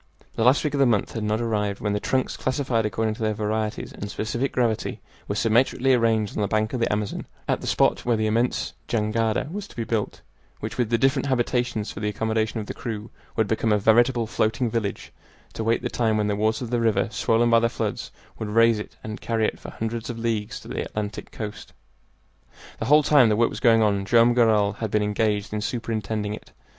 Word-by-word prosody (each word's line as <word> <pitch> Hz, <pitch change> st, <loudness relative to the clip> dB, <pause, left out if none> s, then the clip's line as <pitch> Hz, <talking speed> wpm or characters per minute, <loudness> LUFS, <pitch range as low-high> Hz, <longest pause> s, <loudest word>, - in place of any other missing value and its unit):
The 115 Hz, -, -1 dB
last 125 Hz, +4 st, +4 dB
week 150 Hz, -2 st, -1 dB
of 140 Hz, -, 0 dB
the 135 Hz, -, +5 dB
month 110 Hz, -5 st, +1 dB
had 115 Hz, -, -3 dB
not 105 Hz, +1 st, 0 dB
arrived 105 Hz, -3 st, -1 dB
when 105 Hz, -1 st, -1 dB
the 105 Hz, -, 0 dB
trunks, 130 Hz, +4 st, -1 dB
classified 130 Hz, -4 st, 0 dB
according 110 Hz, +2 st, -1 dB
to 110 Hz, -, -10 dB
their 110 Hz, -1 st, 0 dB
varieties 110 Hz, 0 st, -2 dB
and 100 Hz, -, -6 dB
specific 120 Hz, +6 st, -2 dB
gravity, 115 Hz, -3 st, -1 dB, 0.3 s
were 100 Hz, -, -2 dB
symmetrically 120 Hz, +4 st, +3 dB
arranged 115 Hz, -4 st, +1 dB
on -, -, -1 dB
the 100 Hz, -, +1 dB
bank 110 Hz, +2 st, 0 dB
of 125 Hz, -, -1 dB
the 115 Hz, -, +1 dB
Amazon, 105 Hz, -1 st, -2 dB, 0.2 s
at -, -, 0 dB
the -, -, -6 dB
spot -, -, +2 dB
where 120 Hz, -2 st, +1 dB
the 110 Hz, -, 0 dB
immense 115 Hz, +3 st, 0 dB
jangada 110 Hz, +1 st, 0 dB
was 205 Hz, +2 st, -5 dB
to -, -, -16 dB
be 115 Hz, -, -2 dB
built 110 Hz, -2 st, -2 dB, 0.4 s
which, 110 Hz, +3 st, -6 dB
with 120 Hz, -3 st, +1 dB
the 115 Hz, -, +3 dB
different 135 Hz, +2 st, +2 dB
habitations 120 Hz, -4 st, 0 dB
for -, -, -8 dB
the 105 Hz, 0 st, -1 dB
accommodation 110 Hz, +1 st, -1 dB
of 105 Hz, -, -4 dB
the -, -, -6 dB
crew, 110 Hz, -1 st, -6 dB, 0.2 s
would 110 Hz, -2 st, +1 dB
become 110 Hz, 0 st, 0 dB
a 105 Hz, -, +4 dB
veritable 120 Hz, +3 st, +3 dB
floating 110 Hz, +2 st, 0 dB
village 105 Hz, -4 st, -3 dB, 0.4 s
to 110 Hz, -, -4 dB
wait 115 Hz, +2 st, +1 dB
the -, -, 0 dB
time 110 Hz, -3 st, +1 dB
when 105 Hz, -, +1 dB
the 105 Hz, 0 st, 0 dB
waters 110 Hz, +3 st, 0 dB
of 120 Hz, -, -6 dB
the 120 Hz, -1 st, +1 dB
river, 115 Hz, -1 st, +2 dB
swollen 115 Hz, +2 st, +2 dB
by 115 Hz, -, +6 dB
the 115 Hz, 0 st, +2 dB
floods, -, -, -3 dB, 0.3 s
would 110 Hz, -, -3 dB
raise 115 Hz, 0 st, +4 dB
it 105 Hz, -, -8 dB
and 110 Hz, +1 st, -6 dB
carry 115 Hz, -1 st, 0 dB
it -, -, -2 dB
for -, -, -9 dB
hundreds 115 Hz, +1 st, -4 dB
of 120 Hz, -, -4 dB
leagues 115 Hz, -2 st, -2 dB
to -, -, -14 dB
the -, -, -3 dB
Atlantic 105 Hz, -1 st, -5 dB
coast. 105 Hz, -2 st, -7 dB, 1.1 s
The -, -, -2 dB
whole 150 Hz, +2 st, +5 dB
time 140 Hz, -6 st, +5 dB
the 105 Hz, -, +3 dB
work 115 Hz, +2 st, +2 dB
was -, -, -6 dB
going 115 Hz, -2 st, +5 dB
on 100 Hz, -2 st, +1 dB
Joam 120 Hz, +3 st, +5 dB
Garral 105 Hz, -4 st, +3 dB
had 110 Hz, -, -2 dB
been 105 Hz, +1 st, +1 dB
engaged 105 Hz, 0 st, 0 dB
in 105 Hz, -, -2 dB
superintending 105 Hz, -1 st, -2 dB
it. -, -, -10 dB
110 Hz, 225 wpm, -24 LUFS, 105-120 Hz, 1.1 s, by